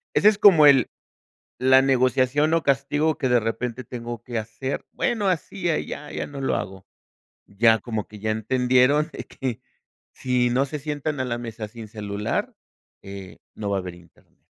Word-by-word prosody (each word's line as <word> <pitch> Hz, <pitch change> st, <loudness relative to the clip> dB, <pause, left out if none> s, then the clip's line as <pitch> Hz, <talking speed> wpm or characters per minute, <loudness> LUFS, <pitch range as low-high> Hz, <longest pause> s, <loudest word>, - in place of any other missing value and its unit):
Ese 210 Hz, -, +5 dB
es 210 Hz, -1 st, -2 dB
como 165 Hz, -7 st, +7 dB
el 135 Hz, -4 st, +6 dB, 0.7 s
la 130 Hz, +1 st, +5 dB
negociación 135 Hz, +4 st, +2 dB
o 165 Hz, -, 0 dB
castigo 145 Hz, +3 st, +1 dB
que 130 Hz, -, 0 dB
de 120 Hz, -1 st, +4 dB
repente 115 Hz, +2 st, -3 dB
tengo 120 Hz, -1 st, -7 dB
que 120 Hz, -2 st, -3 dB
hacer, 115 Hz, +5 st, -5 dB
bueno, 225 Hz, -5 st, 0 dB
hacía, 175 Hz, 0 st, -1 dB
ya 150 Hz, -, -7 dB
ya -, -, -3 dB
no 140 Hz, -1 st, -8 dB
lo 135 Hz, -, 0 dB
hago, 95 Hz, 0 st, -6 dB, 0.6 s
ya, 110 Hz, +2 st, +3 dB
como 110 Hz, -2 st, -4 dB
que 105 Hz, -1 st, -13 dB
ya 110 Hz, 0 st, -1 dB
entendieron 125 Hz, +6 st, +2 dB
que 130 Hz, -5 st, -6 dB, 0.5 s
si 125 Hz, -2 st, 0 dB
no 130 Hz, +3 st, +2 dB
se 145 Hz, +1 st, -6 dB
sientan 145 Hz, -1 st, -3 dB
a -, -, 0 dB
la 120 Hz, -1 st, -3 dB
mesa 115 Hz, -2 st, -6 dB
sin 115 Hz, 0 st, -10 dB
celular, 105 Hz, -1 st, -3 dB, 0.5 s
eh, 95 Hz, -1 st, -10 dB, 0.2 s
no 105 Hz, -2 st, -4 dB
va 100 Hz, -, +1 dB
a -, -, 0 dB
haber 90 Hz, -1 st, -7 dB
Internet. 85 Hz, -1 st, -22 dB
125 Hz, 175 wpm, -24 LUFS, 110-145 Hz, 0.7 s, como